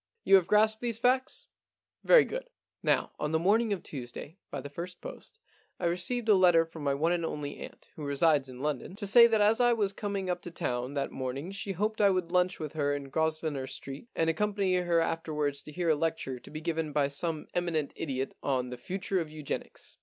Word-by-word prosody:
* 460 Hz, -, -53 dB
You -, -, +2 dB
have 180 Hz, -2 st, 0 dB
grasped 215 Hz, +1 st, +3 dB
these 235 Hz, -2 st, +1 dB
facts? 255 Hz, +2 st, +1 dB, 0.6 s
Very -, -, +7 dB
good. -, -, -5 dB, 0.3 s
Now, -, -, +1 dB
on 150 Hz, +1 st, -2 dB
the -, -, +4 dB
morning 210 Hz, +6 st, +2 dB
of 195 Hz, -4 st, -2 dB
Tuesday, 140 Hz, +6 st, -7 dB
by 140 Hz, -, -4 dB
the 135 Hz, -, -6 dB
first 175 Hz, +4 st, -6 dB
post, -, -, -10 dB, 0.4 s
I 180 Hz, -, -2 dB
received 185 Hz, +8 st, -1 dB
a 215 Hz, -, +7 dB
letter 175 Hz, -4 st, +5 dB
from 165 Hz, -2 st, -10 dB
my 140 Hz, -1 st, +1 dB
one 160 Hz, +4 st, +1 dB
and 175 Hz, -1 st, 0 dB
only 150 Hz, -3 st, -4 dB
aunt, -, -, -10 dB
who 155 Hz, -, -7 dB
resides 140 Hz, -1 st, +2 dB
in 125 Hz, 0 st, -9 dB
London, 150 Hz, +4 st, -3 dB
to 205 Hz, 0 st, -5 dB
say 235 Hz, +4 st, +8 dB
that 220 Hz, -2 st, +2 dB
as 215 Hz, +3 st, +4 dB
I 240 Hz, 0 st, +5 dB
was 205 Hz, -4 st, 0 dB
coming 200 Hz, -2 st, -3 dB
up 175 Hz, -1 st, -1 dB
to -, -, -6 dB
town 125 Hz, -4 st, -3 dB
that 140 Hz, -1 st, -1 dB
morning 135 Hz, +6 st, -4 dB
she 195 Hz, 0 st, -4 dB
hoped 215 Hz, +4 st, -1 dB
I 200 Hz, -, +6 dB
would 185 Hz, -3 st, 0 dB
lunch 180 Hz, 0 st, +2 dB
with 155 Hz, -3 st, -5 dB
her 145 Hz, -2 st, 0 dB
in 140 Hz, -1 st, -6 dB
Grosvenor 155 Hz, -2 st, -1 dB
Street 135 Hz, -, -7 dB
and 165 Hz, -, +1 dB
accompany 200 Hz, +3 st, +1 dB
her 175 Hz, -2 st, +2 dB
after 165 Hz, -1 st, -2 dB
wards 145 Hz, -1 st, -1 dB
to 150 Hz, -, -11 dB
hear 175 Hz, +1 st, -1 dB
a 155 Hz, -, +5 dB
lecture 150 Hz, -5 st, -2 dB
to -, -, -13 dB
be 155 Hz, +1 st, -7 dB
given 160 Hz, -2 st, -2 dB
by 145 Hz, -1 st, +2 dB
some 155 Hz, +2 st, -2 dB
eminent 165 Hz, -5 st, -1 dB
idiot 135 Hz, -3 st, -3 dB
on 125 Hz, -3 st, -1 dB
The 125 Hz, -, -5 dB
Future 190 Hz, +7 st, -2 dB
of 160 Hz, -, -5 dB
Eugenics." 150 Hz, -2 st, -6 dB
165 Hz, 225 wpm, -30 LUFS, 145-195 Hz, 0.6 s, say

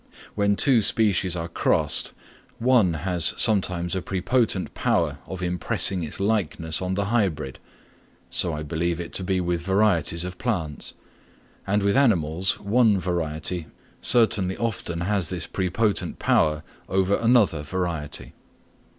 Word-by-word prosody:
When 100 Hz, -1 st, +1 dB
two 125 Hz, 0 st, +5 dB
species 100 Hz, -5 st, +2 dB
are 85 Hz, -1 st, -4 dB
crossed, 85 Hz, -, 0 dB, 0.5 s
one 115 Hz, -8 st, +3 dB
has 90 Hz, -3 st, +1 dB
sometimes 90 Hz, -5 st, +2 dB
a 95 Hz, -, -2 dB
prepotent 95 Hz, +2 st, 0 dB
power -, -, 0 dB
of 95 Hz, -1 st, -6 dB
impressing 90 Hz, +1 st, +2 dB
its 75 Hz, -, -6 dB
likeness 95 Hz, -6 st, -1 dB
on 95 Hz, 0 st, -2 dB
the 100 Hz, 0 st, -1 dB
hybrid. 80 Hz, -, -1 dB, 0.7 s
So 85 Hz, -, +1 dB
I 75 Hz, -1 st, -4 dB
believe 85 Hz, +2 st, -2 dB
it 85 Hz, -, -7 dB
to 95 Hz, -, -1 dB
be 95 Hz, 0 st, 0 dB
with 90 Hz, -1 st, -1 dB
varieties 90 Hz, -3 st, +1 dB
of 90 Hz, 0 st, -7 dB
plants; 85 Hz, -12 st, -3 dB, 0.7 s
and 100 Hz, +1 st, +1 dB
with 100 Hz, 0 st, +2 dB
animals, 95 Hz, -, +2 dB
one 110 Hz, 0 st, +3 dB
variety 85 Hz, -1 st, -3 dB, 0.3 s
certainly 100 Hz, -6 st, +3 dB
often 95 Hz, -7 st, -3 dB
has 95 Hz, -2 st, 0 dB
this 90 Hz, -2 st, -4 dB
prepotent 100 Hz, +3 st, -1 dB
power 75 Hz, -1 st, +1 dB, 0.3 s
over 95 Hz, +2 st, +1 dB
another 115 Hz, -9 st, +2 dB
variety. 80 Hz, -1 st, -4 dB
95 Hz, 135 wpm, -24 LUFS, 85-100 Hz, 0.7 s, two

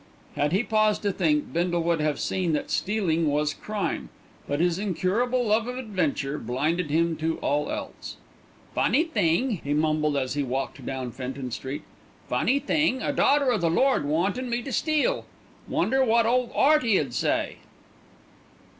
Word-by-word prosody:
Had 145 Hz, +1 st, +1 dB
he 195 Hz, +6 st, +2 dB
paused 215 Hz, -2 st, +2 dB
to 205 Hz, -, +1 dB
think, 155 Hz, -6 st, 0 dB
Bindle 175 Hz, 0 st, 0 dB
would 170 Hz, -1 st, +1 dB
have 150 Hz, -1 st, 0 dB
seen 180 Hz, -4 st, -1 dB
that 150 Hz, -, -2 dB
stealing 180 Hz, -6 st, 0 dB
was 150 Hz, +1 st, +1 dB
crime; 210 Hz, +3 st, -3 dB, 0.4 s
but 145 Hz, +1 st, -1 dB
his 175 Hz, +1 st, +1 dB
incurable 215 Hz, +6 st, 0 dB
love 220 Hz, +2 st, +2 dB
of 250 Hz, 0 st, -4 dB
adventure 160 Hz, -, -2 dB
blinded 150 Hz, +8 st, -1 dB
him 165 Hz, +2 st, +2 dB
to 160 Hz, +1 st, -1 dB
all 145 Hz, +1 st, -1 dB
else. -, -, -6 dB, 0.6 s
"Funny 315 Hz, -, +3 dB
thing," 215 Hz, -, 0 dB
he 145 Hz, +1 st, -1 dB
mumbled 155 Hz, -1 st, +1 dB
as 130 Hz, -2 st, -1 dB
he 145 Hz, -, -1 dB
walked 135 Hz, 0 st, -3 dB
down 130 Hz, -2 st, -4 dB
Fenton 130 Hz, +1 st, -5 dB
Street. 135 Hz, +5 st, -5 dB, 0.4 s
"Funny 270 Hz, -, +2 dB
thing, 280 Hz, -2 st, +1 dB
a -, -, -1 dB
daughter 280 Hz, -2 st, +3 dB
o' 225 Hz, -, +1 dB
the 170 Hz, -2 st, +1 dB
Lord 260 Hz, -, +3 dB
wantin' 190 Hz, -, 0 dB
me 240 Hz, 0 st, -1 dB
to 270 Hz, -, -6 dB
steal. 310 Hz, -, 0 dB, 0.4 s
Wonder 265 Hz, +3 st, +2 dB
wot 230 Hz, -1 st, +3 dB
ole 245 Hz, +1 st, +2 dB
'Earty 275 Hz, -8 st, +4 dB
'ud 135 Hz, -5 st, -3 dB
say." -, -, 0 dB
175 Hz, 165 wpm, -26 LUFS, 150-235 Hz, 0.6 s, Earty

